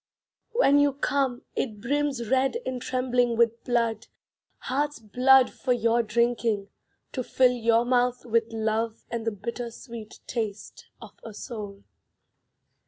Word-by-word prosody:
When 290 - +5
you 285 -1 +3
come, 275 -2 -1
it 215 -5 -2
brims 270 0 -1
Red 265 - +2
and 255 -1 -3
trembling 250 -2 +1
with 230 0 +2
blood, 230 -3 0 0.5
Heart's 290 +3 -1
blood 250 +4 +4
for 250 - 0
your 235 0 +2
drinking; 230 -2 0 0.4
To 255 - -3
fill 255 +1 +3
your 230 -1 +2
mouth 245 0 +1
with 230 -1 +1
love 220 0 -2
And 230 -1 -3
the - - +2
bitter 235 +4 -5
sweet 230 -2 -10
taste 215 -4 -5 0.2
of - - -14
a 220 -2 -9
soul. 205 -3 -7
235 Hz, 135 wpm, -26 LUFS, 225-255 Hz, 0.5 s, When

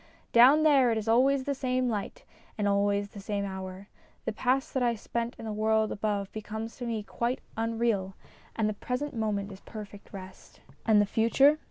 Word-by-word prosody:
Down 265 +6 +7
there 275 -5 +5
it 225 - +1
is 220 0 -3
always 260 +4 +4
the 280 - -1
same 255 -1 0
light 210 -4 -3 0.3
and 205 -1 0
always 200 0 +1
the 200 - -10
same 200 0 -2
hour. 190 0 -6 0.4
The 225 - -1
past 260 +6 0
that 265 - 0
I 240 -1 +2
spent 235 +2 -3
in - - -8
the 215 - -3
world 220 0 +2
above 200 -2 -2
becomes 220 +1 -6
to 245 - -5
me 225 -2 -2
quite 235 +5 -2 0.2
unreal, 225 -4 0 0.4
and 220 -2 +1
the 215 - 0
present 250 +6 -4
moment 210 -2 -1
is 190 - -10
perfect 210 -2 -10
rest. 190 -1 -11 0.3
And 215 -2 +6
the 205 - +4
future 270 +8 +4
220 Hz, 190 wpm, -29 LUFS, 205-245 Hz, 0.4 s, Down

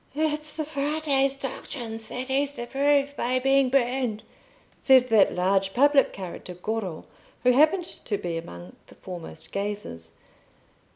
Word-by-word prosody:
"It's 305 0 0
the 310 -1 -3
Frate's 285 -2 +1
doctrines 235 -4 -6
that 255 +1 -4
he's 280 +1 0
to 240 - -5
prove 280 +2 +1
by 255 -1 0
being 270 0 +3
burned," 250 -4 0 0.6
said 260 -2 +5
that 220 -3 +4
large 195 +2 +1
public 285 +2 +4
character 180 -1 -8
Goro, 190 -3 -4 0.4
who 250 - +5
happened 315 +7 +4
to 210 -10 -4
be 175 -4 -4
among 90 - -8
the - - -17
foremost 165 -3 -9
gazers. 195 - -5
250 Hz, 135 wpm, -26 LUFS, 195-280 Hz, 0.6 s, said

